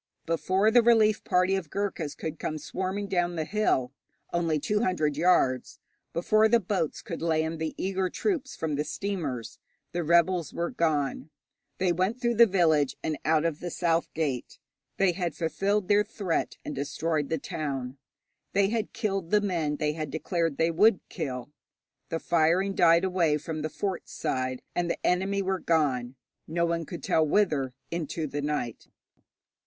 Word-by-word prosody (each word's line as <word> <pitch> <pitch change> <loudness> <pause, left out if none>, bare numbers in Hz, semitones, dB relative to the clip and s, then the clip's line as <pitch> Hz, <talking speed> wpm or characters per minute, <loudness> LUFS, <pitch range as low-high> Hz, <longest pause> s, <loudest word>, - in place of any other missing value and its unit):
Before 185 +6 +2
the 240 +1 +7
relief 225 -2 +4
party 185 +1 +2
of 180 -5 -4
Ghurkas 190 -7 -3
could 160 -1 -5
come 155 - -3
swarming 190 +6 -3
down 175 -2 0
the 160 -1 -2
hill, 165 -11 +1 0.4
only 165 -2 +1
two 210 +8 0
hundred 170 -9 +1
yards, 145 -6 +2 0.3
before 215 +6 +3
the 235 +1 +5
boats 185 -6 -2
could 175 -7 -6
land 160 0 0
the 160 -1 -3
eager 190 -1 -1
troops 315 - -2
from 160 -2 -2
the 150 - +1
steamers, 150 - -4 0.3
the 175 0 -2
rebels 170 0 +2
were 170 +5 -1
gone. 155 - 0 0.5
They 185 -1 +2
went 190 +8 0
through 235 -1 +1
the 235 0 +8
village 160 -8 +2
and 155 -2 -2
out 155 0 +3
of 165 -3 -1
the 175 - -4
south 170 -1 0
gate. 145 -6 -2 0.4
They 195 -2 +4
had 175 -3 -3
fulfilled 195 +4 0
their 205 0 +4
threat 195 -5 -2
and - - -4
destroyed 145 +2 -2
the 160 - 0
town. 135 -3 -4 0.5
They 195 0 +3
had 225 -1 -2
killed 195 -6 -2
the 210 - +4
men 170 -7 -1
they 150 0 0
had 155 -2 -4
declared 165 0 -1
they 165 +1 +2
would 200 +4 +5
kill. 135 -5 -5 0.6
The 165 - -1
firing 170 +4 +2
died 170 -1 +5
away 175 -5 +2
from 155 +1 -5
the 155 - -2
fort 190 +2 -4
side, 130 -1 -2
and 175 -1 -1
the - - -3
enemy 195 +2 +1
were 190 0 -1
gone, 135 -8 +1 0.3
no 170 +2 +1
one 165 -2 -1
could 170 -5 -7
tell 160 - +3
whither, 150 -7 +1 0.2
into 165 -1 -3
the 145 0 -3
night. 145 -6 -3
170 Hz, 170 wpm, -28 LUFS, 155-190 Hz, 0.6 s, the